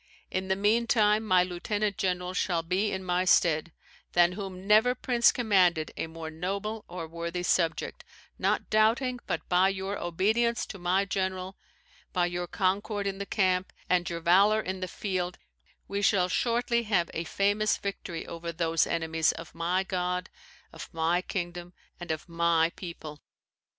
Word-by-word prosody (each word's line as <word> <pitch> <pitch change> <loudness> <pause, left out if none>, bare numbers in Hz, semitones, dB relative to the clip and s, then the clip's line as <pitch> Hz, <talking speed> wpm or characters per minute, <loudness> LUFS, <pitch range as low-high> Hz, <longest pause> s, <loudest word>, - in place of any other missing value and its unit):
In 190 0 -2
the 190 - +2
meantime, 215 +1 +3
my 185 -4 +4
lieutenant 200 +3 -2
general 180 -1 -1
shall 175 -2 0
be 190 +5 0
in 190 0 -3
my 180 0 +1
stead, 170 -3 +3 0.4
than 175 0 +5
whom 190 -1 -7
never 220 +5 +5
prince 240 -1 +3
commanded 185 -9 +2
a - - -3
more 160 0 -7
noble 200 +6 -3
or 175 -2 -6
worthy 170 +2 -4
subject, 165 -3 0 0.4
not - - +1
doubting 245 +4 +2
but - - -3
by 185 +2 +4
your 195 +1 -3
obedience 220 +7 +1
to 195 - -9
my 185 +3 +1
general, 185 -1 -2 0.6
by 180 -2 +2
your 175 0 -3
concord 200 +2 -1
in 195 0 -2
the 200 - -4
camp, 185 -3 +1 0.2
and 180 -1 +2
your 170 -1 -4
valour 195 +6 +5
in 190 -2 -4
the 185 - -3
field, 180 -2 -3 0.5
we 200 0 -2
shall 195 -3 +3
shortly 235 +2 +1
have 195 -7 0
a 165 - -2
famous 205 +5 +1
victory 185 -4 -5
over 170 0 -6
those 165 -1 +1
enemies 160 -1 +1
of 165 0 -10
my 180 +3 0
God, 180 0 -2 0.4
of - - -9
my 165 +2 +1
kingdom, 175 -1 -5 0.3
and 175 - -8
of 155 +1 -3
my 170 -1 +2
people." 160 -4 -8
185 Hz, 160 wpm, -28 LUFS, 175-205 Hz, 0.6 s, than